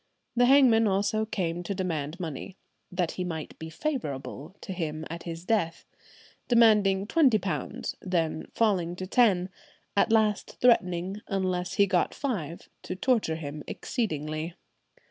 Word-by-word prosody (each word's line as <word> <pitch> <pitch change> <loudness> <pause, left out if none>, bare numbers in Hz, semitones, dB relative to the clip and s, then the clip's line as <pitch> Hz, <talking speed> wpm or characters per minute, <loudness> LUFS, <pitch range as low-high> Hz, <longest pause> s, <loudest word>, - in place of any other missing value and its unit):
The 245 +1 +5
hangman 250 -5 +6
also 205 +2 +1
came 175 -5 -2
to 195 +3 -4
demand 165 -3 -3
money, 170 +3 -6 0.3
that 180 -2 0
"he 180 - -4
might 160 -4 -5
be 160 - -6
favourable 160 - -4
to 190 - -5
him 160 -3 -3
at 170 0 -6
his 165 +1 -7
death," 180 -7 0 0.6
demanding 210 -5 +5
twenty 265 -2 +4
pounds, 175 -9 -3
then 165 -4 -1
falling 185 -6 +1
to 185 - -5
ten, 190 -4 +3 0.5
at 205 - +3
last 215 -2 +1
threatening, 190 -4 +2
unless 185 -3 -1
he 200 - +5
got 185 -3 +1
five, 180 - -4
"to 185 - -5
torture 215 -6 +1
him 150 -1 -6
exceedingly. 155 - -3
185 Hz, 140 wpm, -28 LUFS, 165-215 Hz, 0.6 s, hangman